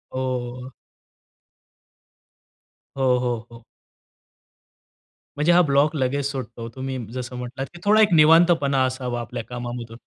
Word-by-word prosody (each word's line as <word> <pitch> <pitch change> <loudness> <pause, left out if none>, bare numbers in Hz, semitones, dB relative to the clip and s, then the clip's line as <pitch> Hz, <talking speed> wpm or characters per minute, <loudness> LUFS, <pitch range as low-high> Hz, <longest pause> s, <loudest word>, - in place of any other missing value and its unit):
ओह! 125 -1 -4 2.3
हो, 130 -2 +3
हो, 125 -1 -1
हो. 115 0 -13 1.7
म्हणजे 150 +4 +3
हा 175 +1 +6
ब्लॉक 145 0 +2
लगेच 140 0 -1
सुटतो 120 -4 -6
तुम्ही 130 0 -4 0.2
जसं 125 -1 -6
म्हटलात, 125 +2 -5
की 175 - -11
थोडा 215 +2 +5
एक 210 -4 +4
निवांतपणा 155 -3 +5
असावा 130 -2 -3
आपल्या 115 - -6
कामामधून. 120 -1 -6
130 Hz, 115 wpm, -23 LUFS, 125-145 Hz, 2.3 s, हा